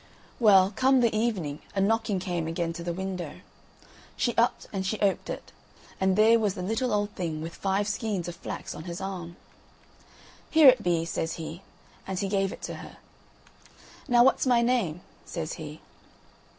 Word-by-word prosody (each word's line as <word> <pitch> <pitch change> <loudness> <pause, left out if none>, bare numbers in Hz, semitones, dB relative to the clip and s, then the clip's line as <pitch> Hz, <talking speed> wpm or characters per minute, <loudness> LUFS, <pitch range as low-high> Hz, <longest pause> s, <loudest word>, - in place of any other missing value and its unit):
Well, 195 -4 +6
come 260 0 +4
the 230 -2 +2
evening 195 -10 -1
a - - +1
knocking 220 0 +1
came 175 -3 -2
again 165 0 -2
to 170 0 -7
the 175 - -2
window. 180 -3 -5 0.8
She 240 - 0
upped 235 +1 +2
and 190 -1 -1
she 200 +3 -2
oped 200 -2 +1
it, - - -6 0.5
and 190 0 +2
there 220 +2 +6
was 210 -3 0
the 180 - -5
little 225 +6 -1
old 205 0 0
thing 165 -6 -4
with 165 +2 -6
five 195 +1 -1
skeins 205 -4 -2
of 175 - -5
flax - - -6
on 160 - -9
his 175 -1 -5
arm. 180 -3 -5 1.1
"Here 315 -3 +7
it 255 -3 +4
be," 170 -3 +1
says 165 -1 -2
he, 160 +2 -7 0.5
and 190 -1 -3
he 200 - -1
gave 195 -1 +1
it - - -10
to - - -5
her. - - -11 1.1
"Now, 240 -1 +6
what's 265 +1 +3
my 240 -2 +4
name?" 220 -10 0 0.2
says 165 -1 -5
he. 155 -2 -8
190 Hz, 175 wpm, -27 LUFS, 170-220 Hz, 1.1 s, Here